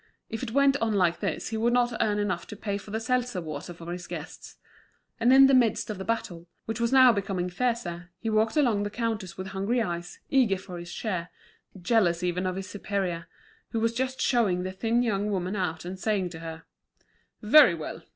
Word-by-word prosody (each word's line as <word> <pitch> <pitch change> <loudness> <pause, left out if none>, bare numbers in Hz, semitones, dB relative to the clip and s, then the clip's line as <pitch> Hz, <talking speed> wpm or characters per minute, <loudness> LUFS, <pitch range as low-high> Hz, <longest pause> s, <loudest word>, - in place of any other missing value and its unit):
If 225 - -4
it 255 - -3
went 280 +3 +4
on 225 -4 0
like 180 -3 +2
this, 195 -7 -3
he 225 - -3
would 235 +2 +2
not 245 -1 +2
earn 210 -1 +1
enough 190 -4 -2
to - - -8
pay 200 -1 -3
for 210 - -13
the 220 +2 -2
seltzer 245 -3 -1
water 155 0 -6
for 170 0 -8
his 180 0 -7
guests. - - -8 0.6
And 235 +2 +4
in 270 +1 +9
the 270 - +4
midst 235 -4 +3
of 205 - -6
the - - -4
battle, 195 -6 -3 0.2
which 225 +2 -4
was 235 0 +1
now 260 -2 +7
becoming 190 -3 -2
fiercer, 180 -5 -2
he 225 - -6
walked 220 +4 +2
along 240 -8 +3
the 205 - -2
counters 215 -4 -3
with 190 0 -5
hungry 200 +5 -1
eyes, 175 -5 -3
eager 245 -8 +3
for 180 -1 -9
his 175 0 -9
share, 180 -6 -3 0.5
jealous 180 -3 +2
even 180 +1 0
of 185 - -2
his 195 0 -5
superior, 190 -4 -3 0.5
who 225 - +1
was 230 +1 +1
just 260 +2 -2
showing 205 -8 +2
the 185 - -3
thin 225 +5 +1
young 210 -3 0
woman 190 0 -2
out, 175 -4 -2
and 185 +1 -6
saying 200 -3 0
to 165 - -8
her: 160 0 -8 0.8
"Very 230 - +7
well! 155 - -6
205 Hz, 210 wpm, -27 LUFS, 180-230 Hz, 0.8 s, in